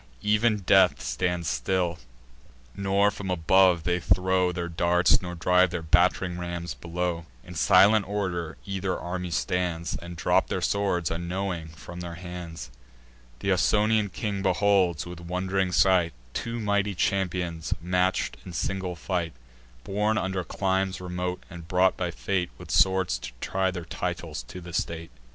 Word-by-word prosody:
Ev'n 105 +1 +3
death 95 0 +5
stands 85 +8 -1
still; 90 -1 0 0.8
nor 100 +1 +2
from 100 -2 -6
above 90 0 +4
they 90 +1 +1
throw 90 +1 +2
Their 85 0 -3
darts, 85 +1 +3
nor 90 -1 -5
drive 90 +2 +4
their 85 -1 -4
batt'ring 90 +2 +2
rams 85 -3 -4
below. 85 +4 -3 0.2
In - - -10
silent 105 0 +5
order 90 -5 -2
either 95 -2 -2
army 90 0 -4
stands, 85 -2 -1
And 85 +4 -7
drop 80 - +2
their - - -2
swords, 95 -5 0
unknowing, 85 0 -3
from 80 +3 -10
their 85 -1 -6
hands. 85 -6 -8 0.7
Th' 100 - +1
Ausonian 105 +3 +3
king 100 0 -3
beholds, 95 -3 +2
with 90 -1 -8
wond'ring 90 +2 -1
sight, 90 -2 +4 0.2
Two 115 0 -3
mighty 100 -2 0
champions 90 -3 -1
match'd 90 +2 0
in 90 - -9
single 95 0 -2
fight, 85 -1 -2 0.5
Born 105 +2 0
under 95 -2 -1
climes 95 0 -1
remote, 90 0 -4
and 85 -1 -10
brought 90 +1 +3
by 90 -1 -2
fate, 90 +1 -1
With - - -9
swords 95 -10 +3
to - - -7
try 95 +5 0
their 90 -2 -5
titles 80 - -4
to 90 - -8
the 85 0 -10
state. 85 0 -3
90 Hz, 145 wpm, -27 LUFS, 85-95 Hz, 0.8 s, death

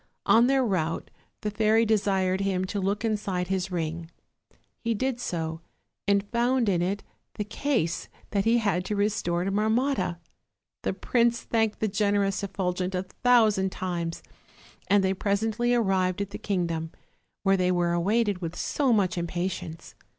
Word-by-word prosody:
On 235 +2 +6
their 270 -1 +3
route 170 -6 -1 0.3
the 210 - -2
fairy 220 +2 +3
desired 195 -3 +1
him 190 -1 0
to 200 +2 -3
look 200 +3 -1
inside 195 -5 -1
his 190 0 -1
ring; 165 -1 -3 0.7
he 230 -1 -1
did 260 +2 -1
so, 160 -6 -3 0.5
and 200 0 +2
found 245 0 +2
in 180 -4 +2
it 195 +3 -1 0.3
the 210 - -2
case 210 - -1 0.2
that 200 -2 +1
he 230 +2 +4
had 200 -6 +1
to 210 - -2
restore 200 -4 0
to 195 - -1
Marmotta. 220 -1 +1 0.6
The - - -1
prince 235 -1 +1
thanked 220 -2 0
the 220 - +2
generous 200 -1 +1
Effulgent 185 -1 -2
a 180 - -1
thousand 215 -2 +3
times, 175 -3 -3 0.6
and 200 -1 +4
they 190 0 +2
presently 220 +5 0
arrived 190 -5 +1
at 200 0 -3
the - - -6
kingdom, 170 -5 -2 0.5
where 195 0 +4
they 180 -1 +2
were 175 -1 +1
awaited 200 +2 +1
with 170 0 -4
so 275 +5 0
much 190 -5 +2
impatience. 175 -1 -4
195 Hz, 155 wpm, -27 LUFS, 180-220 Hz, 0.7 s, On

